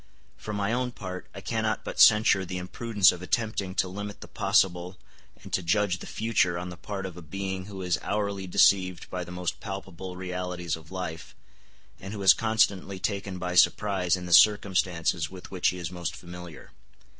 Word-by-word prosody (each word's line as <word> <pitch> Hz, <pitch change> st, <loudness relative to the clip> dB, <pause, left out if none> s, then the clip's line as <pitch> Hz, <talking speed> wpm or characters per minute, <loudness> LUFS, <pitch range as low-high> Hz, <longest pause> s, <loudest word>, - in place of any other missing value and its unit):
For 105 Hz, -, -7 dB
my 100 Hz, +1 st, -1 dB
own 125 Hz, 0 st, -1 dB
part, 95 Hz, -4 st, -7 dB
I 95 Hz, -, -7 dB
cannot 110 Hz, +3 st, -1 dB
but -, -, -6 dB
censure 105 Hz, -3 st, +6 dB
the 90 Hz, 0 st, -5 dB
imprudence 105 Hz, +3 st, +3 dB
of 90 Hz, -, -8 dB
attempting 100 Hz, -1 st, -1 dB
to 95 Hz, -, +1 dB
limit 105 Hz, +2 st, -7 dB
the -, -, -9 dB
possible 90 Hz, 0 st, +1 dB, 0.5 s
and -, -, -11 dB
to -, -, +2 dB
judge 95 Hz, +1 st, +1 dB
the -, -, -9 dB
future 110 Hz, -6 st, +1 dB
on 90 Hz, +1 st, -5 dB
the 90 Hz, -, -8 dB
part 95 Hz, +2 st, -6 dB
of 90 Hz, -2 st, -7 dB
a -, -, -8 dB
being 95 Hz, +3 st, -4 dB
who 95 Hz, -2 st, -7 dB
is 90 Hz, -1 st, 0 dB
hourly 100 Hz, -2 st, -2 dB
deceived 90 Hz, -1 st, +3 dB
by 90 Hz, -1 st, -3 dB
the 90 Hz, -, -10 dB
most 90 Hz, -1 st, -3 dB
palpable 95 Hz, -2 st, -7 dB
realities 90 Hz, -2 st, -3 dB
of 80 Hz, -1 st, -14 dB
life, 90 Hz, -3 st, -6 dB, 0.6 s
and 95 Hz, +2 st, -7 dB
who 100 Hz, -, -6 dB
is 95 Hz, -, +9 dB
constantly 100 Hz, -4 st, +1 dB
taken 100 Hz, 0 st, -3 dB
by 90 Hz, 0 st, -3 dB
surprise 90 Hz, -1 st, +3 dB
in 90 Hz, -, -7 dB
the 90 Hz, -, -1 dB
circumstances 90 Hz, -6 st, +4 dB
with 95 Hz, -1 st, -11 dB
which 90 Hz, -2 st, +1 dB
he 90 Hz, -, 0 dB
is 85 Hz, -2 st, -5 dB
most 85 Hz, -1 st, -4 dB
familiar. 90 Hz, -2 st, -10 dB
95 Hz, 190 wpm, -27 LUFS, 90-100 Hz, 0.6 s, is